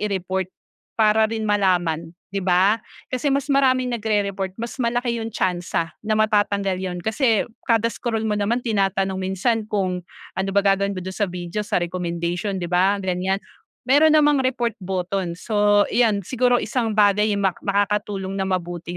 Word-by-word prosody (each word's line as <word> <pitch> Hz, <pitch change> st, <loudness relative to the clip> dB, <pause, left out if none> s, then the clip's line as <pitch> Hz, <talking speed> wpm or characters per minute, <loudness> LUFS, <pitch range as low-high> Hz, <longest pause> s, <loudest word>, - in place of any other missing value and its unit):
i-report 190 Hz, -2 st, -2 dB, 0.5 s
para 220 Hz, 0 st, +4 dB
rin 220 Hz, -1 st, -3 dB
malaman, 175 Hz, -5 st, 0 dB, 0.2 s
di 195 Hz, -, -1 dB
ba? 190 Hz, +4 st, +3 dB, 0.3 s
Kasi 255 Hz, +3 st, 0 dB
mas 280 Hz, +1 st, 0 dB
maraming 255 Hz, -2 st, +2 dB
nag-rereport, 200 Hz, -4 st, -1 dB
mas 235 Hz, +1 st, -5 dB
malaki 235 Hz, 0 st, 0 dB
yung 225 Hz, -, -3 dB
tsansa 175 Hz, -4 st, -2 dB
na 215 Hz, 0 st, -1 dB
matatanggal 205 Hz, -3 st, +1 dB
yun 180 Hz, -1 st, -3 dB
kasi 225 Hz, -1 st, +2 dB, 0.2 s
kada 230 Hz, -1 st, +2 dB
scroll 225 Hz, -2 st, -2 dB
mo 215 Hz, -, 0 dB
naman 210 Hz, +4 st, 0 dB
tinatanong 195 Hz, -3 st, 0 dB
minsan 210 Hz, +4 st, -1 dB
kung 185 Hz, -4 st, -1 dB, 0.3 s
ano 190 Hz, +1 st, -2 dB
ba 200 Hz, -, +4 dB
gaawing 200 Hz, 0 st, +2 dB
mo 185 Hz, -, -5 dB
dun 190 Hz, -, -5 dB
sa 205 Hz, -1 st, -1 dB
video 175 Hz, +3 st, -4 dB
sa 210 Hz, -, -1 dB
recommendation, 175 Hz, +2 st, -2 dB
di 180 Hz, -, -3 dB
ba 180 Hz, +3 st, +2 dB
ganyan? 190 Hz, 0 st, -1 dB, 0.5 s
Meron 305 Hz, +3 st, +6 dB
namang 295 Hz, -3 st, +4 dB
report 240 Hz, -3 st, -1 dB
button. 185 Hz, -1 st, -2 dB
So 205 Hz, +2 st, +2 dB
iyan, 220 Hz, -4 st, +2 dB
siguro 245 Hz, +4 st, +1 dB
isang 230 Hz, -4 st, -1 dB
bagay 210 Hz, 0 st, +3 dB
ma 190 Hz, -2 st, +1 dB
makakatulong 200 Hz, -1 st, -1 dB
na 195 Hz, -, -1 dB
mabuti 175 Hz, -1 st, -3 dB
200 Hz, 160 wpm, -22 LUFS, 185-225 Hz, 0.5 s, Meron